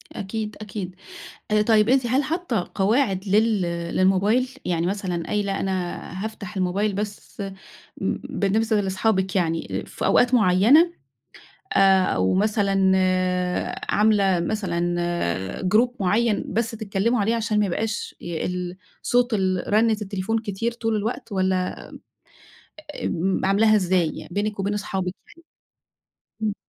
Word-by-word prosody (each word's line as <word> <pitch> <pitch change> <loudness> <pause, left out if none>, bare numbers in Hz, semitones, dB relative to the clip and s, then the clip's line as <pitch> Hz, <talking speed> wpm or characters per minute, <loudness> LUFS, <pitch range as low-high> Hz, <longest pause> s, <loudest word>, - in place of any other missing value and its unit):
أكيد، 210 +2 -4
أكيد. 195 -3 -6 0.6
آآ 210 0 +4
طيب 215 0 +3
أنتِ 260 -1 +3
هل 260 +4 +2
حاطّة 290 - -2
قواعد 200 -1 +1
لل 215 +1 +3 0.3
للموبايل؟ 200 +7 +3 0.2
يعني 170 -1 0
مثلًا 185 -3 -2
قايلة 200 -2 -1
أنا 185 -2 -2 0.3
هافتح 215 -1 -7
الموبايل 195 +3 0
بس 205 +1 -6
م 200 - -3 0.6
م - - 0
بالنسبة 215 +2 +1
لصحابك 190 0 0
يعني، 165 -3 0
آآ - - -9
في - - -5
أوقات 245 +1 +3
مُعيّنة؟ 235 - +5 0.9
آآ 195 -1 +6
أو 95 - +1
مثلًا 195 -2 +2 1.0
عاملة 200 -4 +3
مثلًا 175 -3 -1 0.8
Group 235 +3 +5
مُعيّن 210 +3 +1
بس 230 +1 -1
تتكلِّمُوا 220 +1 -1
عليه، 220 +3 +1
عشان 225 -2 0
ما 210 - +2
يبقاش 210 +4 -3
ي 170 -2 -4
ال 180 0 -4 0.3
صوت 245 -1 +2
ال 185 -3 0
رنِّة 220 +1 +4
التليفون 200 +2 -2
كتير 220 +2 -3
طول 225 -2 -1
الوقت؟ 215 +1 -4
والّا 185 -1 +1
م - - -8 1.2
أ - - -6
آمم 185 +3 -1
عاملاها 215 +3 +4
إزاي 185 -4 +2
يعني 175 - -9
بينِك 205 0 -1
وبين 200 +1 -1
اصحابِك 190 -3 -3 0.2
يعني؟ 335 - -19 1.0
إمم. 215 -1 +1
205 Hz, 135 wpm, -23 LUFS, 190-220 Hz, 1.2 s, آآ